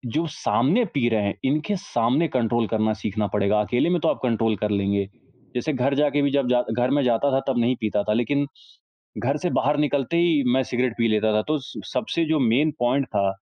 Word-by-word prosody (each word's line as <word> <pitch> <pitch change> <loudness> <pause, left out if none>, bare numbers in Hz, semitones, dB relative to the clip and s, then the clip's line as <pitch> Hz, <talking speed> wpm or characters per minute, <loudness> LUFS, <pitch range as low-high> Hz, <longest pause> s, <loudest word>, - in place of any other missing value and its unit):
जो 165 +2 +1
सामने 135 - +1
पी 130 -4 +1
रहे 110 -2 +1
हैं। 100 -1 -1
इनके 155 +9 0
सामने 135 - 0
कंट्रोल 120 -4 0
करना 110 0 0
सीखना 105 0 -2
पड़ेगा 105 +1 +2
अकेले 120 +9 0
में 175 0 +1
तो 165 - +1
आप - - 0
कंट्रोल 115 -3 +1
कर 105 - 0
लेंगे। 100 0 0 0.5
जैसे 150 +5 -1
घर 135 +2 0
जाके 145 0 +2
भी 140 0 +1
जब 140 -2 +1
जा 125 -1 +3
घर 125 +1 +1
मैं 145 - +2
जाता 125 +3 +1
था 135 - +3
तब 130 -3 +1
नहीं 120 +2 +2
पीता 105 -1 0
था 105 - 0
लेकिन 140 +5 0 0.8
घर 140 +2 +1
से 180 - +1
बाहर 145 +2 +1
निकलते 145 +1 0
ही 170 -4 +3
मैं 130 - +3
सिगरेट 125 0 0
पी 115 -1 +2
लेता 110 0 +1
था। 105 - +2
तो 155 0 +1
स 140 +2 -9
सबसे 170 -6 -1
जो 160 0 +2
मेन 130 +6 +2
पॉइंट 125 +3 +1
था, 100 -4 0
125 Hz, 225 wpm, -23 LUFS, 110-145 Hz, 0.8 s, जा